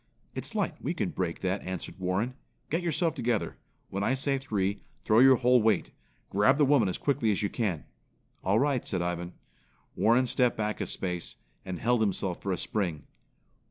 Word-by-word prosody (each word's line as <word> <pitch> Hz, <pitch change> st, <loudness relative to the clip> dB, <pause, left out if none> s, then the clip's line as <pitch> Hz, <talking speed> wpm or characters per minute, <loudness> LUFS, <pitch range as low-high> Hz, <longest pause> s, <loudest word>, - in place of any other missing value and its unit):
"It's -, -, -4 dB
light, -, -, -1 dB
we -, -, -2 dB
can -, -, -1 dB
break 90 Hz, -3 st, -3 dB
that," 95 Hz, +1 st, -1 dB
answered 95 Hz, 0 st, -6 dB
Warren. 95 Hz, +7 st, -1 dB, 0.4 s
"Get 165 Hz, +3 st, +1 dB
yourself 170 Hz, -1 st, 0 dB
together. 120 Hz, -7 st, -1 dB, 0.3 s
When 100 Hz, +1 st, -2 dB
I 130 Hz, -, +2 dB
say 135 Hz, 0 st, +1 dB
three, 100 Hz, -6 st, -1 dB, 0.2 s
throw 110 Hz, +1 st, +4 dB
your 130 Hz, +1 st, +8 dB
whole 125 Hz, 0 st, +4 dB
weight. 110 Hz, -4 st, +2 dB, 0.4 s
Grab 115 Hz, +8 st, +4 dB
the 150 Hz, -, +5 dB
woman 135 Hz, -8 st, +4 dB
as 90 Hz, -, -3 dB
quickly 125 Hz, -6 st, +1 dB
as 105 Hz, 0 st, +1 dB
you 100 Hz, -, -1 dB
can." 100 Hz, -10 st, -2 dB, 0.6 s
"All 100 Hz, +3 st, +3 dB
right," 140 Hz, -2 st, +1 dB
said 90 Hz, -4 st, -1 dB
Ivan. 90 Hz, 0 st, -3 dB, 0.6 s
Warren 120 Hz, +3 st, +4 dB
stepped 125 Hz, 0 st, +1 dB
back 105 Hz, 0 st, -2 dB
a -, -, -2 dB
space 90 Hz, -2 st, -4 dB, 0.3 s
and 90 Hz, -1 st, -5 dB
held 120 Hz, +4 st, +1 dB
himself 95 Hz, -3 st, -1 dB
for 100 Hz, -, -2 dB
a 90 Hz, -, 0 dB
spring. 85 Hz, -9 st, -2 dB
110 Hz, 185 wpm, -29 LUFS, 95-130 Hz, 0.6 s, your